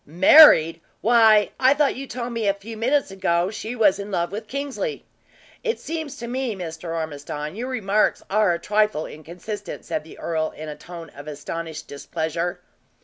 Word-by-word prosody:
"Married? 170 - +7 0.2
Why, 220 -2 +5
I 265 +2 +5
thought 290 -1 +2
you 275 +1 -6
told 245 -1 -5
me 225 -3 -1
a 200 - +2
few 215 +3 -9
minutes 255 +2 +1
ago 180 -1 0
she 220 +2 -5
was 205 -4 +3
in 200 +1 -6
love 175 -3 -1
with 215 +2 -6
Kingsley. 280 - -4 0.6
It 460 -2 -1
seems 315 -3 -5
to 235 - -6
me, 250 -2 -2
Mr. 165 -2 -6
Ormiston, 150 0 -5
your 245 +4 -4
remarks 215 -4 +1
are 210 -2 +3
a 170 - 0
trifle 210 -3 +1
inconsistent," 180 +6 -8
said - - -3
the 160 - -13
earl, 160 -1 -2
in 155 0 -7
a 150 - -6
tone 170 -2 -10
of 145 +2 -12
astonished 155 +2 -6
displeasure. 160 +4 -3
200 Hz, 175 wpm, -23 LUFS, 165-235 Hz, 0.6 s, Married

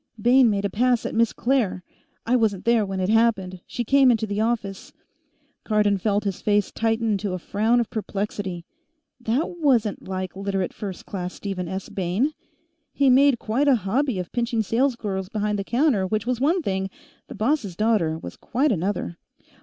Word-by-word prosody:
"Bayne 245 +2 +5
made 200 -1 0
a - - 0
pass 245 +1 +2
at - - -3
Miss 230 0 +3
Claire. 235 -8 0 0.4
I 245 - +2
wasn't 215 -6 +1
there 235 -2 +4
when 190 0 -3
it 185 +1 0
happened; 215 -5 +2
she 240 - -3
came 270 +2 +5
into 225 -2 +2
the 205 0 -2
office 220 -4 -2 0.4
" 290 -1 -43
Cardon 210 -2 +2
felt 205 +1 0
his 195 -3 -3
face 205 -1 +1
tighten 225 0 0
into 200 -1 -1
a - - -1
frown 220 +6 +1
of 235 - -2
perplexity. 200 -4 -4 0.5
That 260 +9 -2
wasn't 240 -9 +1
like 185 -1 -4
Literate 195 -1 -2
First 195 -4 -7
Class 180 -2 -5
Stephen 190 -3 -4
S. 190 +2 -5
Bayne. 195 - -1 0.6
He 275 -2 +3
made 270 0 +5
quite 235 +7 0
a 275 - +6
hobby 255 +3 0
of 180 -1 -5
pinching 235 -2 0
salesgirls 215 -5 -1
behind 210 -2 -1
the - - -1
counter 235 -4 +1
which 215 +2 -1
was 250 0 -1
one 330 +5 +2
thing; 190 -3 -1 0.4
the - - -9
boss' 215 - 0
daughter 210 -7 +1
was - - -8
quite 270 +5 0
another. 185 -2 -2
215 Hz, 180 wpm, -24 LUFS, 195-245 Hz, 0.6 s, a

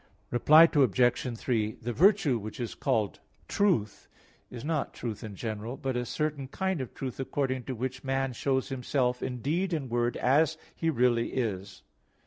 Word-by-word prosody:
Reply 155 +6 +7
Obj. 125 - +3
3: 110 -3 0
The 120 0 -4
virtue 170 - +4
which 110 +3 -8
is 120 -2 -3
called 105 -3 -1 0.3
"truth" 120 - 0 0.4
is 125 +2 -8
not 155 -2 -2
truth 115 -4 -5
in 105 -2 -7
general, 110 +4 -5
but 130 -1 -3
a 125 0 -2
certain 150 -3 -2
kind 190 +2 -2
of 130 - -7
truth 130 -2 -5
according 130 -2 -2
to 130 - -4
which 130 +2 -4
man 135 -1 -1
shows 130 +2 -1
himself 125 -1 -1
in 125 -2 -4
deed 175 +6 0
and 140 -7 -3
word 120 0 0
as 155 +5 +3 0.2
he 165 - 0
really 120 -4 +2
is. 100 -6 -3
130 Hz, 165 wpm, -29 LUFS, 120-145 Hz, 0.4 s, Reply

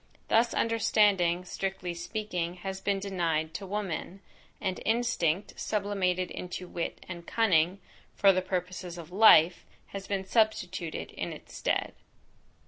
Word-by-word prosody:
Thus 230 +1 +3
understanding, 205 -6 +3
strictly 190 -1 -3
speaking, 180 -1 -3
has 190 0 -4
been 200 0 +1
denied 165 -5 -1
to 195 - -6
woman; 195 -1 -4 0.4
and 190 -2 -2
instinct, 215 -6 +1
sublimated 195 -3 0
into 180 0 -6
wit 170 -1 -5
and 170 -2 -8
cunning, 185 -4 +3 0.4
for 195 -1 +6
the 185 - +1
purposes 180 -1 -4
of 170 0 -9
life, 180 -4 +6 0.3
has 195 -1 -7
been 195 -1 -2
substituted 190 -6 0
in - - -4
its - - -11
stead. - - -1
185 Hz, 130 wpm, -29 LUFS, 175-205 Hz, 0.4 s, for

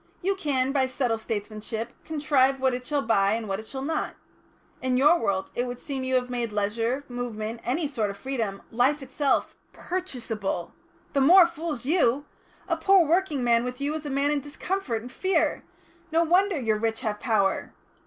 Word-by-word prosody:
You 390 +2 +2
can, 270 -7 0
by 270 -2 +2
subtle 250 -3 -1
statesmanship, 220 +2 -4
contrive 275 -4 +2
what 260 -1 +2
it 250 0 -5
shall 290 -2 0
buy 200 -3 +3
and 225 -1 -2
what 195 0 -2
it 220 - -9
shall 265 -1 -5
not. 315 +2 -2 0.7
In 255 -1 +1
your 300 +6 +5
world 195 -3 -1
it 245 +1 -1
would 245 0 -5
seem 270 -1 -5
you 260 0 0
have 250 -1 +1
made 240 -2 -2
leisure, 225 +6 -1
movement, 230 -2 -4
any 300 +5 0
sort 230 -8 -1
of 200 - -6
freedom, 225 -7 -3
life 265 +5 +2
itself, 270 +1 0 0.2
purchaseable. 235 - -3 0.4
The 280 - +2
more 350 +6 +8
fools 325 -6 -4
you! 290 -3 +2 0.4
A - - 0
poor 385 -3 +5
working 315 -4 +1
man 235 -1 +3
with 250 0 -5
you 285 +2 -1
is 310 -1 -4
a - - -3
man 280 +1 +1
in 295 - +1
discomfort 290 - -3
and 250 - -9
fear. 380 +6 0 0.5
No 330 +1 +4
wonder 360 +1 +3
your 220 -4 0
rich 225 0 -1
have 210 -2 -2
power. 200 -5 +1
255 Hz, 185 wpm, -26 LUFS, 225-295 Hz, 0.7 s, more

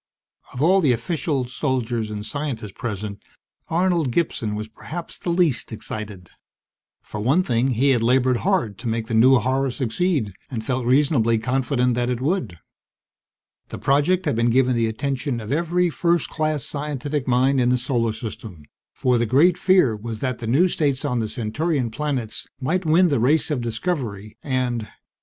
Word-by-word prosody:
Of 125 - -3
all 190 +4 +5
the 140 -7 +4
officials, 130 0 -2
soldiers, 120 -6 -1
and 105 0 -5
scientists 135 -8 -4
present, 105 -2 -5 0.5
Arnold 170 -4 +1
Gibson 115 -7 -1
was 110 +1 -4
perhaps 160 +10 -8
the - - -4
least 170 -9 +1
excited. 105 -4 -7 0.7
For 105 - -7
one 135 - +2
thing, 120 -3 +1
he 135 +4 +3
had 120 -3 +2
labored 125 +1 +3
hard 170 - 0
to 120 - -5
make 115 0 -1
the 115 - -5
new 125 +4 +6
horror 130 +2 0
succeed 130 - -1 0.2
and 115 -5 -5
felt 125 -2 -1
reasonably 125 -4 +3
confident 125 +1 0
that 120 +1 0
it 125 -2 -1
would. 145 - -1 1.1
The - - -6
project 150 +7 +2
had 145 - +1
been 115 +1 +2
given 130 +1 +3
the 115 -1 +1
attention 135 +2 -2
of 110 +1 -7
every 170 +3 +1
first 170 0 +1
class 155 -3 -1
scientific 145 -1 -3
mind 130 +2 +3
in 120 - +3
the 125 - +3
Solar 120 -2 0
System; 110 -6 -8 0.3
for 125 -2 +2
the 120 - +1
great 155 +9 +4
fear 180 - +3
was 110 +1 -6
that 130 -1 -2
the 115 - -5
new 145 +11 +4
states 145 -5 -1
on 125 -4 0
the 110 -1 -2
Centaurian 130 +3 -1
planets 130 -4 -3
might 165 +6 -1
win 170 +3 +5
the 140 - +1
race 150 +7 +2
of 140 -5 0
discovery 115 - -3
and... 125 -5 -1
130 Hz, 170 wpm, -22 LUFS, 115-150 Hz, 1.1 s, new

